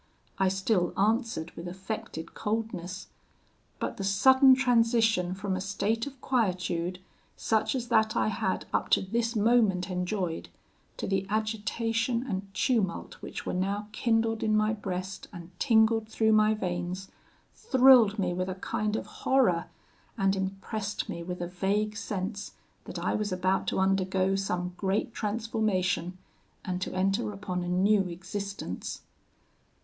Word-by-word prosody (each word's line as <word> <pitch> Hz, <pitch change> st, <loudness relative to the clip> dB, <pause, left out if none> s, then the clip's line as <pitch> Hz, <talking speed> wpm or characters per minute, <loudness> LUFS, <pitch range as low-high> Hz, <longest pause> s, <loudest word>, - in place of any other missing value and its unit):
I 190 Hz, -, +4 dB
still 190 Hz, -1 st, +1 dB
answered 215 Hz, -5 st, +1 dB
with 170 Hz, -, -8 dB
affected 185 Hz, -3 st, -6 dB
coldness; 210 Hz, -4 st, -3 dB, 0.7 s
but -, -, -3 dB
the 195 Hz, -, -4 dB
sudden 260 Hz, +7 st, +6 dB
transition 230 Hz, -7 st, +2 dB
from 195 Hz, -1 st, -2 dB
a 185 Hz, -, -3 dB
state 200 Hz, +5 st, -1 dB
of 275 Hz, -2 st, -10 dB
quietude, 180 Hz, -7 st, 0 dB, 0.4 s
such 220 Hz, +3 st, +1 dB
as 245 Hz, -2 st, -3 dB
that 220 Hz, -2 st, +3 dB
I -, -, +2 dB
had 190 Hz, -2 st, -1 dB
up -, -, 0 dB
to -, -, -3 dB
this 230 Hz, +4 st, -1 dB
moment 210 Hz, -4 st, +3 dB
enjoyed, 180 Hz, -1 st, -2 dB, 0.5 s
to -, -, -3 dB
the 195 Hz, 0 st, -1 dB
agitation 225 Hz, +3 st, -1 dB
and 195 Hz, -2 st, -4 dB
tumult 210 Hz, -9 st, 0 dB
which -, -, -7 dB
were -, -, -2 dB
now 200 Hz, +3 st, -1 dB
kindled 225 Hz, -1 st, +1 dB
in 215 Hz, -1 st, +2 dB
my 215 Hz, +1 st, +2 dB
breast 190 Hz, -2 st, -5 dB
and 175 Hz, 0 st, -10 dB
tingled 225 Hz, -2 st, +3 dB
through 220 Hz, 0 st, +2 dB
my 215 Hz, 0 st, +4 dB
veins, 180 Hz, -1 st, -4 dB, 0.4 s
thrilled 255 Hz, -, +6 dB
me 180 Hz, -3 st, 0 dB
with 185 Hz, +1 st, -2 dB
a 185 Hz, -, -3 dB
kind 210 Hz, +3 st, -2 dB
of -, -, -3 dB
horror, 235 Hz, -11 st, +2 dB, 0.5 s
and 195 Hz, -1 st, +2 dB
impressed 195 Hz, +2 st, -3 dB
me 170 Hz, -, -4 dB
with 180 Hz, +1 st, -5 dB
a 175 Hz, -, -2 dB
vague 200 Hz, +4 st, -1 dB
sense 200 Hz, 0 st, -4 dB, 0.3 s
that -, -, -7 dB
I -, -, -1 dB
was 210 Hz, -1 st, -1 dB
about 185 Hz, +1 st, 0 dB
to -, -, 0 dB
undergo 190 Hz, 0 st, +2 dB
some 180 Hz, -2 st, -2 dB
great 200 Hz, +4 st, -1 dB
transformation, 205 Hz, -5 st, -1 dB, 0.5 s
and 180 Hz, 0 st, -2 dB
to -, -, -2 dB
enter 195 Hz, +2 st, +1 dB
upon 195 Hz, -3 st, -4 dB
a 175 Hz, -, -3 dB
new 195 Hz, +2 st, +3 dB
existence. 195 Hz, +3 st, -5 dB
200 Hz, 145 wpm, -29 LUFS, 185-220 Hz, 0.7 s, sudden